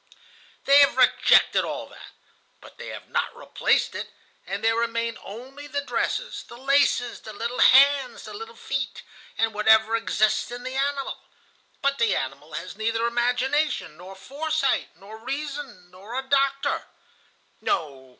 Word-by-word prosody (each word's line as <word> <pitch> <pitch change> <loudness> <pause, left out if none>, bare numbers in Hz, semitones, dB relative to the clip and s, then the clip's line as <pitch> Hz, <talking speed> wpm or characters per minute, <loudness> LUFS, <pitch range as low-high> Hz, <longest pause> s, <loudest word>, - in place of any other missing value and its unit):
"They 280 +1 +7
have 280 -2 +5
rejected 255 -1 +5
all - - -4
that, - - -14 0.5
but - - -16
they - - -7
have - - -8
not - - -2
replaced - - 0
it, - - -5 0.4
and - - -4
there 225 0 +4
remain 230 0 -1
only 265 +7 -10
the 285 0 -2
dresses, - - -2
the 235 - -11
laces, 270 -2 +2
the 215 - -9
little 235 +4 -4
hands, 275 -1 +5
the 215 - -9
little 225 +2 -8
feet, 275 +3 -4 0.3
and 225 -1 +1
whatever 220 +1 +4
exists 215 -1 +1
in 245 +1 -7
the 255 +1 -5
animal. 275 0 -1 0.6
But 280 0 +1
the 230 -3 +3
animal 140 +4 -5
has 170 +5 -6
neither 225 +2 -1
imagination, 245 - 0
nor 185 +2 -11
foresight, 290 +6 -1
nor 210 +3 -12
reason, 275 -8 -6
nor 200 +7 -8
a 265 - -1
doctor. 275 0 +1 0.7
"No! 135 -4 -2
240 Hz, 150 wpm, -25 LUFS, 215-275 Hz, 0.7 s, They